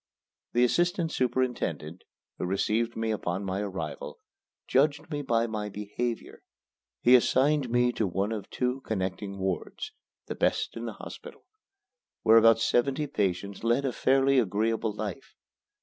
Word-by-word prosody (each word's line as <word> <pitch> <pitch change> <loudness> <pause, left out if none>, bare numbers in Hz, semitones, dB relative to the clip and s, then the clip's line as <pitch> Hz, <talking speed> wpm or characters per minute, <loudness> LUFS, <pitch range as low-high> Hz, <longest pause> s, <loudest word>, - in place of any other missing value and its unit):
The 120 - +4
assistant 175 +5 +1
superintendent, 120 - -1 0.3
who - - -1
received 110 +5 0
me 110 0 0
upon 95 -2 -2
my 95 0 -2
arrival, 100 -2 -5 0.5
judged 150 +3 +2
me 145 -1 -2
by 115 -4 +1
my 105 -2 -3
behavior. 105 +4 -4 0.6
He 125 - +6
assigned 130 +2 +4
me 120 +1 +3
to 110 -3 -1
one 95 +4 -1
of 105 -3 -5
two 125 +1 -1
connecting 100 -1 -3
wards 95 -1 -3 0.3
the - - -4
best - - 0
in 115 0 -5
the 115 - -4
hospital - - -11 0.8
where 110 +1 +7
about 115 0 +7
seventy 135 +6 +1
patients 100 -5 -2
led 120 +4 +2
a 130 - -1
fairly 135 0 +3
agreeable 110 +1 0
life. 105 -2 -6
115 Hz, 140 wpm, -28 LUFS, 100-130 Hz, 0.8 s, where